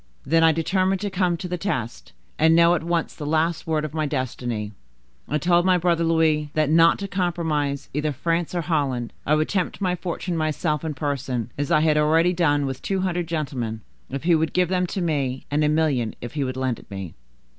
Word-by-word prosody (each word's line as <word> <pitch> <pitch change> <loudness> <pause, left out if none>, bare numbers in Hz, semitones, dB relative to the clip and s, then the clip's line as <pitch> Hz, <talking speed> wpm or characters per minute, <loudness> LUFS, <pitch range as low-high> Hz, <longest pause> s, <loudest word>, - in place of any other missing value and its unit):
"Then 165 0 +3
I 165 - +6
determined 185 +4 +1
to 205 -1 -2
come 180 -2 +1
to 180 - -5
the 180 0 -3
test, 120 - -3 0.3
and 160 +1 +5
know 170 +1 +6
at 175 - 0
once 170 0 -1
the - - -8
last 160 +3 0
word 155 -1 0
of 150 - -7
my 155 -1 -1
destiny. 120 -6 -3 0.6
I 150 - +1
told 175 +2 +3
my 185 0 +4
brother 170 -1 +1
Louis, 160 -2 +2
that, 155 -1 +2
not 165 +1 +5
to 200 - -4
compromise 160 -7 -1
either 150 +2 0
France 165 +5 -1
or 175 - +1
Holland, 140 -7 -1
I 150 - +4
would 155 0 +1
tempt 185 -4 -1 0.2
fortune 175 0 -3
myself 155 -1 -1
in 155 -2 -3
person, 130 -5 -3
as 145 +1 -2
I 155 -2 +4
had 155 -1 +3
already 165 +4 +3
done, 145 -5 +2
with 135 -1 -4
two 195 -1 -1
hundred 175 -2 -1
gentlemen, 130 -9 -3 0.3
if 135 +2 -5
he 170 +1 +3
would 160 0 +1
give 180 -1 +2
them 180 -1 +1
to 190 - -3
me; 140 -6 -1
and 150 +1 +2
a 150 - +3
million, 150 -8 +1
if 120 - -7
he 145 -2 -1
would 130 -1 -3
lend 130 -3 -1
it - - -17
me." 95 -5 -6
155 Hz, 215 wpm, -23 LUFS, 140-170 Hz, 0.6 s, I